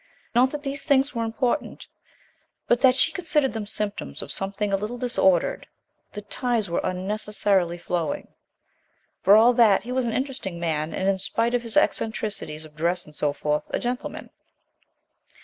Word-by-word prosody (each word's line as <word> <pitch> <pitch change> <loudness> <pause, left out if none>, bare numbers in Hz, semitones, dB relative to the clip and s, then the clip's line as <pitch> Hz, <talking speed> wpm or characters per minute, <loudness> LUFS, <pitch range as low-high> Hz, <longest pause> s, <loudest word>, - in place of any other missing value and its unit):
Not 250 +2 +4
that 295 +1 -6
these 275 0 -4
things 280 -1 +2
were 230 -2 -1
important, 240 +5 -2 0.8
but 240 0 +2
that 260 -2 +6
she - - +3
considered 305 -6 0
them 220 -2 -4
symptoms 210 -1 0
of - - -8
something 195 +1 -2
a - - +5
little 210 +5 -4
disordered. 190 -8 +1 0.5
The 210 - -7
ties 225 -2 -2
were - - 0
unnecessarily 190 -1 0
flowing. 170 -3 -3 0.9
For 200 - +6
all 230 +3 +6
that 225 -5 +5
he 245 - -7
was 255 0 0
an 230 - -1
interesting 260 -10 -3
man, 155 -2 -1
and, 190 - -2
in 195 -1 +2
spite 230 +5 0
of 245 - +2
his 230 +2 -3
eccentricities 210 - 0
of 150 -1 -16
dress 175 +3 0
and 150 - -15
so 150 0 0
forth, 150 +1 -2
a - - +1
gentleman. 245 +1 -4
215 Hz, 165 wpm, -24 LUFS, 185-245 Hz, 0.9 s, that